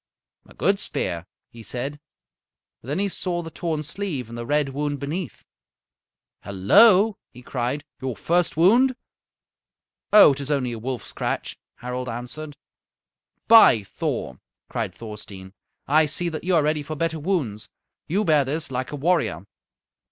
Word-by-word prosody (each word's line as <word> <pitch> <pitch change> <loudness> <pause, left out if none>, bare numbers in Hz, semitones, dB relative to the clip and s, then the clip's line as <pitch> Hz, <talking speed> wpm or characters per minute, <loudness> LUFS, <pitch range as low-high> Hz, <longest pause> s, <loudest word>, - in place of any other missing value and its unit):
"A - - -18
good - - +1
spear," 85 +1 -3 0.2
he 115 - -12
said. 130 +6 -5 0.8
Then 140 +7 -4
he 200 +1 +1
saw 180 -2 -3
the 165 - -8
torn 160 -2 -3
sleeve 155 - -4
and 115 - -8
the 120 0 -6
red 145 -1 +1
wound 145 +1 -3
beneath. 150 - -5 1.0
"Hello!" 195 - +5
he 125 - -15
cried. 125 +3 -3 0.2
"Your 130 -2 -3
first 170 - 0
wound?" 240 +10 +5 1.2
"Oh, 210 -7 +9
it 140 - -6
is 140 - -5
only 135 -4 0
a 115 - -5
wolf 125 +2 -4
scratch," - - -4 0.2
Harald 125 +1 -5
answered. 140 +6 -6 0.9
"By 220 - +7
Thor!" 65 -8 -4 0.3
cried - - -3
Thorstein, 100 -4 -10 0.3
"I 155 +2 +4
see 170 +4 -2
that 155 -2 -6
you 180 0 +1
are 160 - +4
ready 150 0 0
for 155 +2 -6
better 160 +1 -1
wounds. 145 - -2 0.4
You 195 +6 +1
bear 155 -6 +4
this 145 +2 -4
like 130 0 -3
a - - -4
warrior." 145 - 0
145 Hz, 150 wpm, -24 LUFS, 125-170 Hz, 1.2 s, Oh